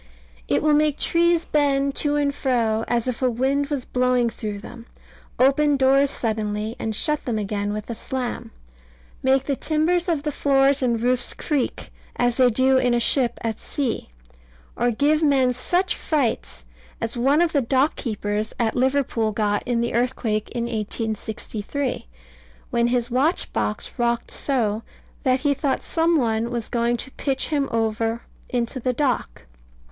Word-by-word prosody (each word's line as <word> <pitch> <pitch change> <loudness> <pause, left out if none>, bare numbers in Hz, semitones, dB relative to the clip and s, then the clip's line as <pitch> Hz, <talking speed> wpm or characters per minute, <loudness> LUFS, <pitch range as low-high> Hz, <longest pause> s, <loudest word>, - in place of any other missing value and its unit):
It - - +1
will 305 -1 +4
make 300 -1 +3
trees 340 0 +2
bend 280 -2 +1
to 295 -1 +1
and 285 -1 +1
fro, 230 -5 0
as 240 0 0
if 255 -1 -3
a 255 - +3
wind 270 +4 0
was 280 -4 -3
blowing 250 -2 +1
through 210 -3 -5
them; 230 +3 -11 0.5
open 280 +3 +4
doors 270 +1 +4
suddenly, 215 -2 -2
and 220 -1 -3
shut 300 +6 0
them 235 -3 -1
again 205 0 -2
with 210 0 -5
a 235 - -3
slam; 250 +2 -4 0.7
make 265 0 +3
the 280 - -1
timbers 330 +5 0
of 315 -4 0
the 300 - -1
floors 275 0 +3
and 235 -3 +1
roofs 245 +1 +1
creak, 290 -5 -2 0.2
as 245 -1 +1
they 255 -2 +5
do 260 +3 +3
in 245 -1 +2
a - - +2
ship 240 0 +2
at 225 -1 -2
sea; 260 - -3 0.7
or 245 - +1
give 290 +6 +2
men 270 -4 +3
such 350 +9 0
frights 250 - -2 0.3
as 230 +2 -3
one 270 +5 +3
of 345 -1 +3
the 285 - +2
dock 265 +4 +2
keepers 210 -2 -3
at 225 -2 +1
Liverpool 255 -4 +1
got 205 -1 0
in 240 -1 +1
the 235 - -1
earthquake 230 -3 0
in 240 -1 -3
1863, 220 - -3 0.6
when 235 0 +2
his 240 0 0
watchbox 245 - -1
rocked 235 0 0
so, 225 -6 0 0.4
that 255 -2 +1
he 290 -1 +2
thought 275 0 -1
some 330 +1 +1
one 230 -3 0
was 235 -2 -4
going 235 0 +1
to 265 - -7
pitch 270 -1 -2
him 285 -3 0
over 225 0 -1 0.3
into 245 +1 -2
the 255 +1 0
dock. 250 - -1
250 Hz, 160 wpm, -23 LUFS, 230-280 Hz, 0.7 s, they